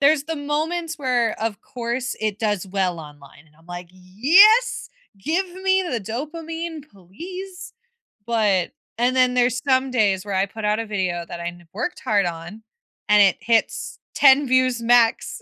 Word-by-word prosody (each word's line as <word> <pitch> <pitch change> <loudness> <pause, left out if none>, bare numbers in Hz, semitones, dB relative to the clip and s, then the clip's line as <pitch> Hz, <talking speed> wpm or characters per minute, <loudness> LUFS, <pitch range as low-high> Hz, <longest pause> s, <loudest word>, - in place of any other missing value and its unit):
there's 280 0 +3
the 325 0 -4
moments 310 +3 -3
where, 245 -4 +1
of 220 -1 -3
course, 245 +1 -4
it 215 -1 -2
does 205 -4 -1
well 185 -3 -1
online, 145 0 -15
and 150 0 -27
I'm 165 - -24
like, 175 0 -8
"Yes, 320 - +4 0.3
give 340 - -1 0.2
me 380 0 +3
the 255 -11 -3
dopamine, 315 - -6
please," 360 - -10 0.5
but 210 -6 +1 0.3
and 250 +2 +1
then 255 -1 +3
there's 245 0 +1
some 260 0 +2
days 205 -6 +1
where 200 -2 -4
I 195 +1 +2
put 215 +2 -9
out 210 +1 +1
a 225 - -4
video 185 -4 -2
that 170 - -7
I 170 - -3
kno 175 0 -17
worked 240 - -4
hard 205 -3 +2
on, 175 +6 -7 0.5
and 210 0 +5
it 195 - +3
hits 230 -1 0 0.2
10 275 0 +5
views 255 -2 +2
max, 235 -1 +2
235 Hz, 165 wpm, -22 LUFS, 195-290 Hz, 0.5 s, and